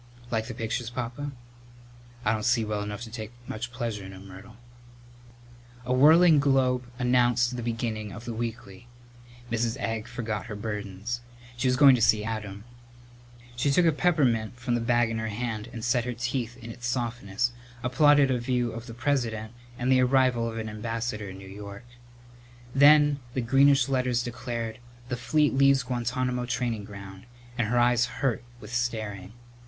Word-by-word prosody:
"Like 110 Hz, -1 st, -1 dB
the 120 Hz, -, -6 dB
pictures, 115 Hz, +1 st, -3 dB
Papa?" 125 Hz, +4 st, -4 dB, 0.9 s
"I 105 Hz, -, +3 dB
don't 110 Hz, -, -2 dB
see 120 Hz, -1 st, +2 dB
well 105 Hz, -1 st, -2 dB
enough 105 Hz, +1 st, -5 dB
to 115 Hz, -2 st, -7 dB
take 110 Hz, -1 st, -6 dB, 0.2 s
much 120 Hz, +2 st, -5 dB
pleasure 115 Hz, -5 st, -4 dB
in 95 Hz, 0 st, -9 dB
'em, 95 Hz, +1 st, -11 dB
Myrtle." 95 Hz, +4 st, -12 dB, 1.3 s
A 125 Hz, -, 0 dB
whirling 155 Hz, +4 st, +7 dB
globe 130 Hz, -3 st, +2 dB
announced 125 Hz, 0 st, +2 dB
the 120 Hz, -, -4 dB
beginning 115 Hz, -2 st, -3 dB
of 115 Hz, +4 st, -9 dB
the 120 Hz, -, -4 dB
weekly. 115 Hz, -1 st, -6 dB, 0.6 s
Mrs. 115 Hz, 0 st, 0 dB
Egg 115 Hz, 0 st, -3 dB
forgot 110 Hz, -3 st, -4 dB
her 105 Hz, -, -6 dB
burdens. 105 Hz, +2 st, -4 dB, 0.3 s
She 125 Hz, +2 st, 0 dB
was 125 Hz, -, +3 dB
going 140 Hz, -1 st, +8 dB
to 125 Hz, -, +1 dB
see 105 Hz, -1 st, +4 dB
Adam. 105 Hz, -2 st, -5 dB, 0.9 s
She 120 Hz, +4 st, +1 dB
took 170 Hz, +6 st, +4 dB
a 165 Hz, -, +5 dB
peppermint 130 Hz, -9 st, +1 dB
from 120 Hz, 0 st, -2 dB
the 120 Hz, -, +1 dB
bag 120 Hz, 0 st, +2 dB
in 115 Hz, -, -2 dB
her 110 Hz, -, -2 dB
hand 110 Hz, 0 st, -4 dB
and 115 Hz, -3 st, -6 dB
set 120 Hz, -1 st, +2 dB
her 125 Hz, -, -2 dB
teeth 120 Hz, 0 st, -3 dB
in 115 Hz, -2 st, -9 dB
its 120 Hz, +1 st, -6 dB
softness, 120 Hz, -2 st, -1 dB, 0.3 s
applauded 140 Hz, +2 st, +5 dB
a 125 Hz, -, +1 dB
view 120 Hz, -1 st, 0 dB
of 115 Hz, +1 st, -8 dB
the 115 Hz, -, -8 dB
President 120 Hz, -4 st, -1 dB, 0.2 s
and 125 Hz, +2 st, 0 dB
the 130 Hz, -1 st, +5 dB
arrival 125 Hz, -2 st, +3 dB
of 115 Hz, -, -6 dB
an 110 Hz, -1 st, -4 dB
ambassador 110 Hz, -1 st, -4 dB
in 95 Hz, -, -9 dB
New 95 Hz, 0 st, -11 dB
York. 100 Hz, +3 st, -9 dB, 0.9 s
Then 145 Hz, +1 st, +6 dB, 0.2 s
the 130 Hz, -, +1 dB
greenish 135 Hz, +2 st, +4 dB
letters 125 Hz, -2 st, +1 dB
declared: 120 Hz, -2 st, -4 dB, 0.3 s
"The 125 Hz, -, -1 dB
fleet 150 Hz, +4 st, +2 dB
leaves 135 Hz, 0 st, +4 dB
Guantánamo 125 Hz, 0 st, -2 dB
training 120 Hz, -4 st, -2 dB
ground," 100 Hz, -1 st, -10 dB, 0.3 s
and 120 Hz, -3 st, 0 dB
her 120 Hz, +3 st, 0 dB
eyes 120 Hz, 0 st, +4 dB
hurt 125 Hz, -4 st, 0 dB, 0.2 s
with 105 Hz, +1 st, -10 dB
staring. 110 Hz, -5 st, -3 dB
120 Hz, 170 wpm, -27 LUFS, 110-125 Hz, 1.3 s, going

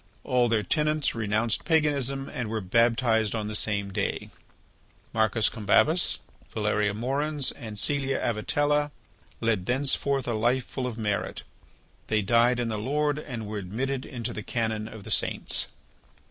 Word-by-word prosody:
All 125 Hz, -1 st, +2 dB
their 110 Hz, -2 st, +2 dB
tenants 150 Hz, +1 st, +1 dB
renounced 110 Hz, 0 st, 0 dB
paganism 140 Hz, -4 st, +1 dB
and 120 Hz, -4 st, -4 dB
were 110 Hz, 0 st, -1 dB
baptized 115 Hz, +1 st, +2 dB
on 110 Hz, -2 st, -2 dB
the 105 Hz, -, -4 dB
same 100 Hz, -2 st, 0 dB
day. 100 Hz, 0 st, -2 dB, 0.8 s
Marcus 110 Hz, 0 st, +3 dB
Combabus, 125 Hz, -, +3 dB, 0.3 s
Valeria 105 Hz, -1 st, 0 dB
Moerens, 140 Hz, +5 st, -1 dB
and 110 Hz, -5 st, -8 dB
Caelia 135 Hz, +3 st, +1 dB
Avitella 145 Hz, +6 st, +1 dB, 0.5 s
led 110 Hz, -5 st, 0 dB
thenceforth 135 Hz, +1 st, +1 dB
a 120 Hz, -, 0 dB
life 120 Hz, +4 st, +1 dB
full 130 Hz, -2 st, -4 dB
of 120 Hz, -2 st, -5 dB
merit. 105 Hz, -3 st, -2 dB, 0.6 s
They 110 Hz, -1 st, +1 dB
died 120 Hz, +3 st, +4 dB
in 120 Hz, -1 st, -1 dB
the 110 Hz, -1 st, -2 dB
Lord 145 Hz, +5 st, 0 dB
and 120 Hz, -7 st, -6 dB
were 105 Hz, 0 st, -4 dB
admitted 130 Hz, +8 st, -3 dB
into 120 Hz, -4 st, -5 dB
the 105 Hz, -, -5 dB
canon 110 Hz, -1 st, -2 dB
of 110 Hz, -2 st, -10 dB
the 110 Hz, -, -7 dB
saints. -, -, +1 dB
115 Hz, 145 wpm, -27 LUFS, 110-135 Hz, 0.8 s, died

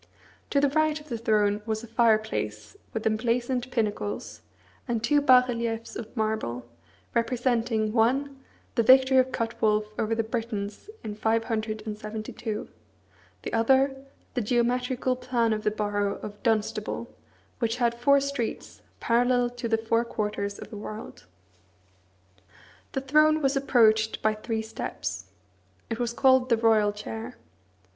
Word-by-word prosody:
To 280 Hz, -, +2 dB
the 285 Hz, 0 st, +3 dB
right 310 Hz, +1 st, +1 dB
of 300 Hz, 0 st, -16 dB
the 235 Hz, -, -2 dB
throne 210 Hz, -2 st, +2 dB
was 220 Hz, 0 st, -2 dB
a -, -, -8 dB
fireplace 215 Hz, -, 0 dB, 0.2 s
with 225 Hz, -, -4 dB
emblazoned 240 Hz, +3 st, 0 dB
pinnacles, 210 Hz, -4 st, -3 dB, 0.5 s
and 235 Hz, -2 st, -1 dB
two 290 Hz, +4 st, +3 dB
bas 255 Hz, -3 st, +6 dB
reliefs 230 Hz, -2 st, -3 dB
of 225 Hz, +2 st, -8 dB
marble, 215 Hz, -, -2 dB, 0.5 s
representing, 230 Hz, -2 st, 0 dB
one, 265 Hz, +4 st, +1 dB, 0.3 s
the 235 Hz, -, +2 dB
victory 260 Hz, +3 st, +6 dB
of 260 Hz, 0 st, +4 dB
Cuthwolf 215 Hz, -3 st, 0 dB
over 225 Hz, +1 st, 0 dB
the 225 Hz, -, 0 dB
Britons, 220 Hz, -, -4 dB
in 215 Hz, -, -4 dB
572; 215 Hz, 0 st, -3 dB, 0.8 s
the -, -, -5 dB
other, 265 Hz, +4 st, +3 dB, 0.4 s
the 250 Hz, -, 0 dB
geometrical 250 Hz, +3 st, 0 dB
plan 245 Hz, -3 st, 0 dB
of 215 Hz, -, -2 dB
the 215 Hz, -, +3 dB
borough 205 Hz, -1 st, -1 dB
of 205 Hz, -1 st, -8 dB
Dunstable, 220 Hz, 0 st, -1 dB, 0.5 s
which 230 Hz, -1 st, 0 dB
had 240 Hz, -2 st, +1 dB
four 280 Hz, +4 st, +4 dB
streets, 280 Hz, -4 st, -4 dB, 0.2 s
parallel 245 Hz, +1 st, +2 dB
to 245 Hz, -1 st, -5 dB
the 225 Hz, -1 st, +2 dB
four 230 Hz, +1 st, +1 dB
quarters 210 Hz, -3 st, -3 dB
of -, -, -10 dB
the 215 Hz, -, -7 dB
world. 215 Hz, -, -8 dB, 1.7 s
The 270 Hz, -, -1 dB
throne 305 Hz, +3 st, +4 dB
was 275 Hz, -2 st, +1 dB
approached 220 Hz, -5 st, +3 dB
by 215 Hz, -, +3 dB
three 220 Hz, +1 st, -3 dB
steps. 220 Hz, -, -5 dB, 0.7 s
It 225 Hz, -, -2 dB
was 240 Hz, -1 st, 0 dB
called 260 Hz, +1 st, +4 dB
the 230 Hz, -, +4 dB
royal 220 Hz, -2 st, +3 dB
chair. 225 Hz, +3 st, -7 dB
230 Hz, 135 wpm, -27 LUFS, 215-250 Hz, 1.7 s, bas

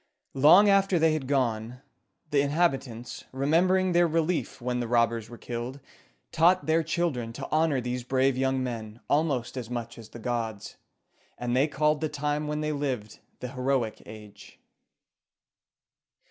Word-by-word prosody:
Long 160 Hz, +10 st, +7 dB
after 195 Hz, -2 st, +4 dB
they 160 Hz, -1 st, +3 dB
had 150 Hz, -4 st, -3 dB
gone, 125 Hz, -2 st, -1 dB, 0.5 s
the 145 Hz, -1 st, +3 dB
inhabitants, 140 Hz, -6 st, -1 dB
remembering 180 Hz, +7 st, +2 dB
their 175 Hz, 0 st, +4 dB
relief 165 Hz, +1 st, -1 dB
when 125 Hz, 0 st, -2 dB
the 120 Hz, -, -2 dB
robbers 115 Hz, -1 st, +1 dB
were 120 Hz, -, -10 dB
killed, 120 Hz, +4 st, -6 dB, 0.5 s
taught 175 Hz, +3 st, +3 dB
their 160 Hz, +1 st, +3 dB
children 160 Hz, -8 st, -2 dB
to 135 Hz, +2 st, -6 dB
honor 155 Hz, -3 st, +2 dB
these 125 Hz, 0 st, -3 dB
brave 130 Hz, +1 st, +1 dB
young 130 Hz, 0 st, 0 dB
men 115 Hz, -3 st, -6 dB
almost 140 Hz, -5 st, 0 dB
as 120 Hz, -3 st, -5 dB
much 120 Hz, -1 st, -5 dB
as 110 Hz, -1 st, -12 dB
the 120 Hz, -, -10 dB
gods, 115 Hz, -3 st, -4 dB, 0.6 s
and 120 Hz, 0 st, -2 dB
they 135 Hz, +4 st, +3 dB
called 150 Hz, 0 st, +1 dB
the 155 Hz, -, -1 dB
time 150 Hz, +1 st, -2 dB
when 150 Hz, 0 st, -2 dB
they 155 Hz, 0 st, -1 dB
lived 130 Hz, -8 st, -3 dB, 0.2 s
the 125 Hz, -, -4 dB
Heroic 130 Hz, -3 st, -1 dB
Age. 105 Hz, -1 st, -13 dB
135 Hz, 150 wpm, -27 LUFS, 120-155 Hz, 0.6 s, Long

